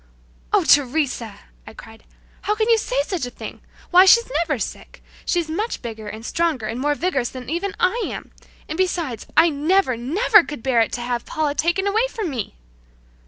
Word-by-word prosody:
"Oh, - - +3
Teresa!" 255 -7 +1 0.3
I - - -11
cried, 225 0 -14 0.4
"how 420 - 0
can 435 0 0
you 455 - +5
say 265 -9 -2
such 330 -5 -3
a - - -6
thing! 245 - -9 0.3
Why, 365 +1 +8
she's 470 +5 +6
never 320 -4 0
sick! - - -7 0.2
She's 345 -2 0
much 410 +6 -3
bigger 220 -2 -7
and 220 +2 -8
stronger 320 -8 -1
and 230 +3 -4
more 295 +2 +1
vigorous 285 -7 -1
than 255 +1 -8
even 380 +4 -2
I 435 +7 +2
am. - - -7 0.4
And 315 - -5
besides, 340 - -1
I 330 +1 +7
never, 310 -1 +1
never 360 - +4
could 295 -8 -8
bear 255 -3 +3
it 225 - 0
to 245 - -3
have 240 0 -3
Paula 310 -2 -1
taken 345 +6 0 0.2
from 430 -10 -4
me!" 240 -6 -5
300 Hz, 185 wpm, -21 LUFS, 245-360 Hz, 0.4 s, Why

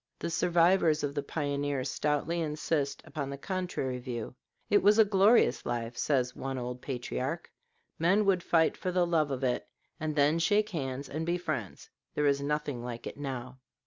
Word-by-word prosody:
The 170 - -4
survivors 170 -2 +3
of 145 -1 -1
the 145 - -1
pioneers 145 -3 -2
stoutly 150 +3 0
insist 150 -2 -1
upon 140 -3 -4
the 140 - -5
contrary 175 -7 -3
view. 120 -3 -5 0.3
"It 205 - +4
was 205 +2 +5
a 220 - +7
glorious 205 +3 +4
life," 120 -1 -3
says 125 -3 0
one 135 0 -4
old 125 0 -5
patriarch; 130 +4 -4 0.5
"men 190 +6 +3
would 190 -2 +3
fight 165 -1 +3
for 185 - -3
the 180 -1 +2
love 160 -4 +2
of 135 -1 -3
it, 125 -1 0 0.3
and 155 -1 -2
then 150 +3 +3
shake 210 +5 +2
hands 140 -6 -4
and 155 +3 -4
be 170 +2 0
friends; 140 - -5 0.2
there 150 - +1
is 140 -1 +3
nothing 145 -4 -2
like 120 -1 -6
it - - -6
now." 130 -2 -5
145 Hz, 175 wpm, -30 LUFS, 130-170 Hz, 0.5 s, a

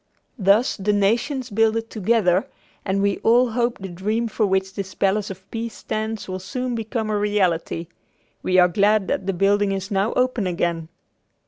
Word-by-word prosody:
Thus 200 +5 +3
the 205 +1 0
nations 235 +6 0
builded 225 +2 +1
together 205 -3 +2 0.4
and 195 0 0
we 200 -1 +1
all 240 +1 +3
hope 235 +1 0
the 195 - -7
dream 210 +6 -2
for 220 -1 0
which 190 0 0
this 190 -1 -6
Palace 200 +1 +1
of 190 0 -10
Peace 230 0 -4
stands 220 0 -4
will 185 0 -4
soon 250 +6 -4
become 220 -1 -3
a 210 - +1
reality. 185 -5 0 0.6
We 185 - +1
are 180 -1 +7
glad 200 +2 +2
that 190 - -2
the 195 - +1
building 200 +2 +2
is 195 +1 -4
now 195 +2 +1
open 250 -5 +1
again. 170 -2 -2
205 Hz, 175 wpm, -22 LUFS, 190-225 Hz, 0.6 s, are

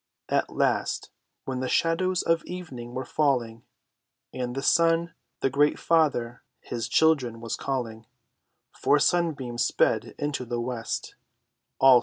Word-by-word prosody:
At - - +1
last, - - 0 0.3
when 130 -1 -3
the 130 0 -2
shadows 180 +2 +1
of 165 0 +2
evening 135 -10 -7
were 130 - -3
falling, 120 -6 0 0.7
And 125 -1 -3
the 135 - -3
sun, 165 0 +3 0.3
their 135 - +1
great 145 +2 +3
father, 140 -8 +1 0.2
his 115 -2 -4
children 135 -8 +3
was 115 0 -3
calling, 115 -5 -4 0.6
Four 145 - +2
sunbeams 145 -7 +1
sped - - +1
into 145 -3 -2
the 120 -1 -3
west. 120 -1 -4
135 Hz, 125 wpm, -26 LUFS, 120-160 Hz, 0.7 s, sun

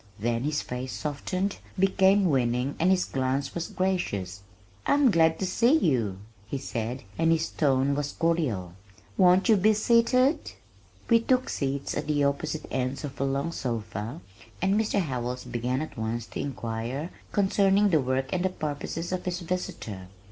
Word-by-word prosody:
Then 115 +3 -1
his 150 0 0
face 125 +1 -5
softened, 185 +7 -2 0.2
became 195 +1 +4
winning 125 -3 +1
and 175 - +3
his 190 -1 +3
glance 130 +1 -1
was 170 -1 -3
gracious. 100 - -2 0.5
"I'm 285 -4 +5
glad 160 -2 +4
to 190 - -2
see 235 +10 +4
you," 120 - +1 0.3
he 140 - -3
said, 125 -1 -4 0.2
and 165 0 +4
his 165 0 +1
tone 135 -2 +2
was 145 0 -2
cordial. 135 - 0 0.4
"Won't 185 +2 +5
you 225 - +6
be 215 +3 +4
seated?" 240 +6 +3 0.5
We 230 -1 +5
took 255 +2 +1
seats 140 0 -2
at - - -3
the 145 -1 +2
opposite 140 +2 -1
ends 130 +2 -2
of 140 -2 -6
a - - +2
long 140 +4 -1
sofa, 115 - -4 0.4
and 190 +2 +2
Mr. 210 -1 +1
Howells 125 -5 -3
began 125 +3 -2
at 155 - -9
once 115 +1 -2
to - - -7
inquire 125 +3 -4 0.2
concerning 200 0 +3
the 160 -3 +4
work 130 +1 -1
and 180 -1 0
the 190 - +2
purposes 160 +1 -4
of 185 -1 -3
his 180 0 -2
visitor. 115 - -4
145 Hz, 160 wpm, -27 LUFS, 125-185 Hz, 0.5 s, you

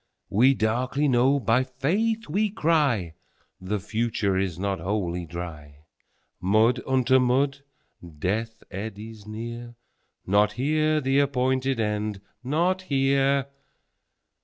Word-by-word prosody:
13We 130 +6 +4
darkly 125 +6 0
know, 130 +2 +3
by 120 +2 +2
Faith 195 - -1
we 205 +7 +1
cry,14The 110 - -2
future 110 -3 0
is 95 -3 -1
not 100 0 -2
Wholly 90 -2 -2
Dry.15Mud 85 - -3
unto 130 0 +3
mud! 135 +3 +1 0.6
Death 110 +7 -2
eddies 105 +2 -7
near 120 +2 -7 0.5
16Not 105 +2 +3
here 155 +4 +1
the 135 +1 +2
appointed 130 -2 +1
End, 105 -1 -1 0.2
not 170 +8 +1
here! 135 -3 +2
120 Hz, 100 wpm, -25 LUFS, 105-135 Hz, 0.6 s, 13We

